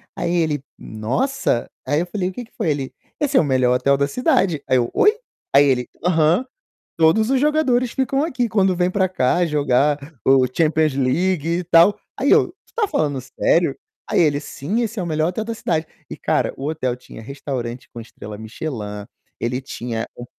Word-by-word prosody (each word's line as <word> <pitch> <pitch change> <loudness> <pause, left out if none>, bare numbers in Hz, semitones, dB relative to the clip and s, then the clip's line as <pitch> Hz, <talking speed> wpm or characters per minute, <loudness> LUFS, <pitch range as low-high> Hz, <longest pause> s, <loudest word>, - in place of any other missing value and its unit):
Aí 170 - -2
ele: 155 -5 0
"Nossa!". 120 - -1 0.2
Aí 145 +4 +1
eu 175 - -2
falei: 185 0 -2
"O - - -7
que 245 - -7
que - - -29
foi?". - - -1
Ele: 140 -3 -2 0.3
"Esse 295 - 0
é - - +7
o - - +4
melhor 130 -3 +2
hotel 140 +2 +2
da 140 0 +1
cidade". 195 - +1
Aí 130 - +4
eu: 120 -1 0
"Oi?". 420 - +5 0.4
Aí 145 +1 +7
ele: 125 -3 +1 0.2
"Aham, 170 +6 +3 0.5
todos 170 +8 +4
os 270 - +2
jogadores 260 -4 +2
ficam 270 +2 0
aqui 250 -7 -1
quando 195 -4 +2
vêm 180 +1 +1
para 190 0 +2
cá 175 -1 +1
jogar 145 -2 +2 0.3
o 135 -1 +5
Champions 155 +2 +1
League 150 +5 +1
e 180 - -4
tal". 175 +4 +5 0.2
Aí 280 - +1
eu: - - +5 0.2
"Tu - - -28
tá 440 -3 0
falando 145 - 0
sério?" 135 +4 +1 0.3
Aí - - +1
ele: 145 -3 +2
"Sim, 165 - -3
esse 225 -1 -3
é 185 - -1
o - - -4
melhor 155 0 0
hotel 220 +5 -3
da 230 +1 -4
cidade". 160 -7 -1 0.2
E - - -7
cara, - - 0
o 135 - -7
hotel 130 -6 -2
tinha 125 - -12
restaurante 125 -1 -5
com 120 - -7
estrela 105 -2 -10
Michelin, 110 -3 -6 0.3
ele 125 +2 -2
tinha 120 -3 -5
um 120 - -8
155 Hz, 195 wpm, -21 LUFS, 130-190 Hz, 0.5 s, é